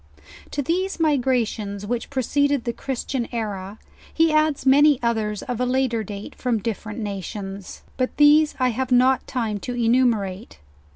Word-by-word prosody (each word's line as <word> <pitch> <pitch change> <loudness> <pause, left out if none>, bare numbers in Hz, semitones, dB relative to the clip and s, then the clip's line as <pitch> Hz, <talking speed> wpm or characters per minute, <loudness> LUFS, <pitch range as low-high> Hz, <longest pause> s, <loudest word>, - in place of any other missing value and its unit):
To 285 - -3
these 370 +6 -1
migrations 240 -9 0
which 235 +2 -3
preceded 285 0 +1
the 235 - -2
Christian 260 -1 -3
era, 205 -4 -4 0.3
he 325 -1 +2
adds 310 -3 +2
many 285 +1 +5
others 220 -3 -1
of 245 -1 -4
a - - +3
later 250 -3 0
date 205 0 -8
from 245 -3 -1
different 215 -1 -5
na 205 -3 -3
tions, 195 0 -8
but 255 -1 -2
these 300 +1 +5
I 255 -1 +3
have 255 +2 -3
not 255 +1 +3
time 225 -5 -2
to 245 +4 -5
enumerate. 230 -4 +1
245 Hz, 155 wpm, -23 LUFS, 215-270 Hz, 0.3 s, many